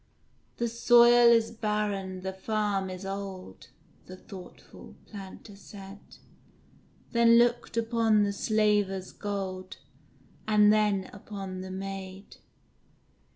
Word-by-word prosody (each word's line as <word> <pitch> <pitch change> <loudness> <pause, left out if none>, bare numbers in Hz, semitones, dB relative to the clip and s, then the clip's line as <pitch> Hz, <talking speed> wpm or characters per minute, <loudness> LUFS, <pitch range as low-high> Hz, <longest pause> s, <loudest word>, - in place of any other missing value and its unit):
"The 235 - -1
soil 240 +1 +6
is 230 -1 +3
barren, 210 -4 -3
the 190 +1 -4
farm 200 -1 -2
is 185 +1 -7
old;" 195 - -7 0.4
The 185 - -10
thoughtful 185 -2 -13
Planter 200 0 -11
said; 195 0 -12 1.1
Then 235 -1 +5
looked 240 0 +1
upon 225 -2 +2
the 200 0 -1
Slaver's 205 -3 0
gold, 190 -2 -5 0.7
And 210 -1 +5
then 210 -3 +1
upon 195 -2 -7
the 190 - -8
maid. 195 0 -8
205 Hz, 105 wpm, -28 LUFS, 190-220 Hz, 1.1 s, soil